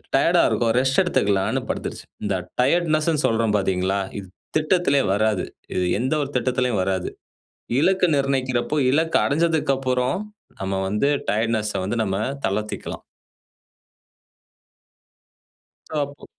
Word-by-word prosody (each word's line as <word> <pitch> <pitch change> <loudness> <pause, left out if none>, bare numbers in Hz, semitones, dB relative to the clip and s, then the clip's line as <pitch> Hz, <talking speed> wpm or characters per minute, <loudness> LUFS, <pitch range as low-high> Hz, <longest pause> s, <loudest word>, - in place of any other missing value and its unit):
டயர்ட்டா - - +4
இருக்கோம் 115 -1 +1
ரெஸ்ட் 135 +5 +3
எடுத்துக்கலாம்னு 100 - +1
படுத்துருச்சு. - - -4 0.2
இந்த 100 -2 0 0.3
டயர்ட்னெஸ்னு 155 +1 +2
சொல்றோம் 115 -2 +2
பார்த்தீங்களா? 95 0 0 0.2
இது 95 - -10 0.3
திட்டத்திலே 155 -3 +2
வராது. 105 -2 +1 0.3
இது 90 - +1
எந்த 130 +5 0
ஒரு 140 - -5
திட்டத்திலேயும் 125 -4 0
வராது. 95 -1 -1 0.7
இலக்கு 185 +3 +3
நிர்ணயிக்கிறப்போ, 135 0 0
இலக்கு 160 +3 +2
அடைஞ்சதுக்கப்புறம், 135 -5 +1 0.4
நம்ம 95 0 -1
வந்து 105 +8 +1 0.2
டயர்ட்னெஸ்ஸ 110 -1 0
வந்து 105 - -2
நம்ம 95 -2 -1 0.3
தளர்த்திக்கலாம். 105 +2 -3 2.9
டாப்பு. 145 -2 -3
125 Hz, 105 wpm, -23 LUFS, 105-145 Hz, 2.9 s, டயர்ட்டா